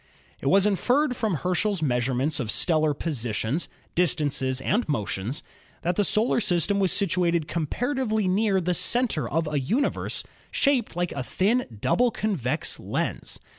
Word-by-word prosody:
It - - -4
was 195 +5 +5
inferred 250 +7 +2
from 220 -6 0
Herschel's 185 +3 0
measurements 130 +2 0
of 120 -5 -3
stellar 155 +2 +2
positions, 125 - -2 0.2
distances 145 -7 0
and 205 - 0
motions 110 -1 -2 0.4
that 175 +2 0
the 205 - +2
solar 215 +4 +2
system 200 0 +1
was 190 -3 +2
situated 170 -4 +1
comparatively 220 - -1
near 195 +1 +2
the 180 0 0
center 235 -2 +1
of 165 +1 0
a 150 -1 0
universe 225 - -1 0.3
shaped 265 - +1
like 175 0 -1
a 140 - -3
thin, 190 - 0
double 245 - +3
convex 165 - -1
lens. - - -3
175 Hz, 140 wpm, -25 LUFS, 145-215 Hz, 0.4 s, was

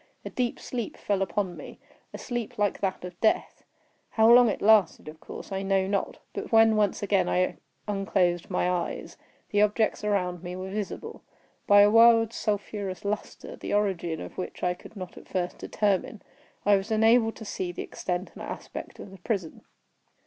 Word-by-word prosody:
A - - -5
deep 245 -2 -1
sleep 240 -4 -5
fell 200 -2 -1
upon 195 -1 -1
me—a - - -13
sleep 240 -3 -5
like 205 -1 0
that 190 -2 -2
of 180 -1 -10
death. 220 - +1 0.5
How 220 0 +3
long 245 -1 +8
it - - -2
lasted 210 -7 +4
of 155 +1 -9
course, - - -10
I 195 0 -2
know 195 -1 +1
not; 195 0 -2 0.2
but - - -6
when, 225 -1 +6
once 210 -1 +1
again, 200 -1 +2
I 185 0 +1 0.3
unclosed 190 -4 0
my 180 -1 0
eyes, 180 -1 -3 0.4
the 205 - +3
objects 210 +1 +1
around 180 -4 0
me 180 0 -6
were 185 +1 -6
visible. 210 -1 -5 0.5
By 205 0 +8
a 205 0 +6
wild 230 0 +6
sulphurous 205 -2 -3
lustre, 210 +1 -4
the - - -3
origin 180 -6 0
of - - -8
which 185 - -6
I 180 0 +2
could 180 - -14
not 185 -2 -8
at - - -18
first 180 -1 -3
determine, 205 0 -1 0.4
I 205 0 +6
was 195 +3 -5
enabled 225 +1 +4
to 220 - -9
see 185 -3 -3
the - - -5
extent 180 +1 -4
and - - -11
aspect - - -7
of 195 - -10
the 195 - -13
prison. 185 -4 -3
200 Hz, 180 wpm, -27 LUFS, 185-215 Hz, 0.5 s, long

